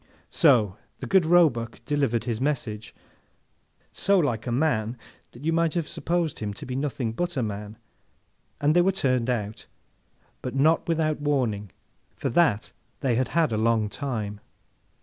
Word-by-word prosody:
So, 115 Hz, -, +4 dB, 0.2 s
the -, -, -6 dB
good 190 Hz, -4 st, +3 dB
Roebuck 145 Hz, -10 st, +3 dB
delivered 140 Hz, -7 st, 0 dB
his 115 Hz, -1 st, -3 dB
message, 115 Hz, -7 st, -2 dB, 1.0 s
so 200 Hz, 0 st, +2 dB
like 125 Hz, -, 0 dB
a -, -, -1 dB
man 120 Hz, -4 st, 0 dB, 0.3 s
that 125 Hz, +5 st, -11 dB
you 165 Hz, -, +2 dB
might 165 Hz, 0 st, +1 dB
have 170 Hz, -3 st, -1 dB
supposed 170 Hz, -3 st, -2 dB
him 105 Hz, -2 st, -4 dB
to -, -, -9 dB
be 125 Hz, -, -5 dB
nothing 135 Hz, -4 st, -2 dB
but 175 Hz, +6 st, -3 dB
a 125 Hz, -, +1 dB
man, 105 Hz, 0 st, -5 dB, 0.8 s
and 150 Hz, +2 st, +2 dB
they 175 Hz, -, +6 dB
were 190 Hz, +2 st, +3 dB
turned 130 Hz, -9 st, 0 dB
out—but, 115 Hz, +2 st, -7 dB
not 155 Hz, +4 st, +3 dB
without 155 Hz, -2 st, 0 dB
warning, 120 Hz, -9 st, 0 dB, 0.5 s
for -, -, -2 dB
that 150 Hz, -9 st, +2 dB, 0.3 s
they 130 Hz, -3 st, +1 dB
had 125 Hz, +2 st, +1 dB
had 165 Hz, -1 st, +1 dB
a 110 Hz, -, 0 dB
long 110 Hz, -1 st, +2 dB
time. 105 Hz, -5 st, -4 dB
130 Hz, 155 wpm, -26 LUFS, 110-160 Hz, 1.0 s, they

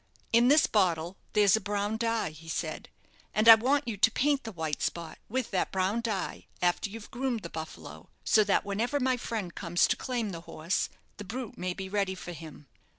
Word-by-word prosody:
"In 235 Hz, +1 st, +6 dB
this 290 Hz, +3 st, +6 dB
bottle 175 Hz, -4 st, +1 dB, 0.2 s
there's 205 Hz, -2 st, +5 dB
a 220 Hz, -, -1 dB
brown 205 Hz, +2 st, -1 dB
dye," 230 Hz, -6 st, 0 dB
he 160 Hz, +1 st, -12 dB
said; -, -, -4 dB, 0.5 s
"and 215 Hz, +2 st, +2 dB
I 225 Hz, -, +14 dB
want 265 Hz, +6 st, +2 dB
you 220 Hz, -3 st, -3 dB
to 210 Hz, -, +5 dB
paint 280 Hz, +2 st, +1 dB
the 225 Hz, -, -5 dB
white 160 Hz, -5 st, -3 dB
spot 170 Hz, -2 st, -3 dB
with 255 Hz, +1 st, -2 dB
that 185 Hz, -, 0 dB
brown 190 Hz, +4 st, 0 dB
dye 215 Hz, -5 st, -3 dB
after 180 Hz, +3 st, +1 dB
you've 225 Hz, +1 st, -10 dB
groomed 245 Hz, -3 st, -2 dB
the 170 Hz, -, -7 dB
'Buffalo,' 160 Hz, 0 st, -8 dB
so 215 Hz, -, +5 dB
that 200 Hz, -, +2 dB
whenever 230 Hz, +8 st, -1 dB
my 260 Hz, -1 st, +2 dB
friend 220 Hz, -7 st, -4 dB
comes 175 Hz, -1 st, +2 dB
to -, -, +1 dB
claim 240 Hz, -5 st, -3 dB
the 165 Hz, -2 st, -7 dB
horse 165 Hz, +1 st, -2 dB, 0.3 s
the 205 Hz, -, -7 dB
brute 235 Hz, +3 st, -6 dB
may 180 Hz, 0 st, -3 dB
be 190 Hz, -1 st, -5 dB
ready 195 Hz, -1 st, -1 dB
for 180 Hz, -, -8 dB
him. 155 Hz, -3 st, -10 dB
205 Hz, 205 wpm, -29 LUFS, 180-230 Hz, 0.5 s, I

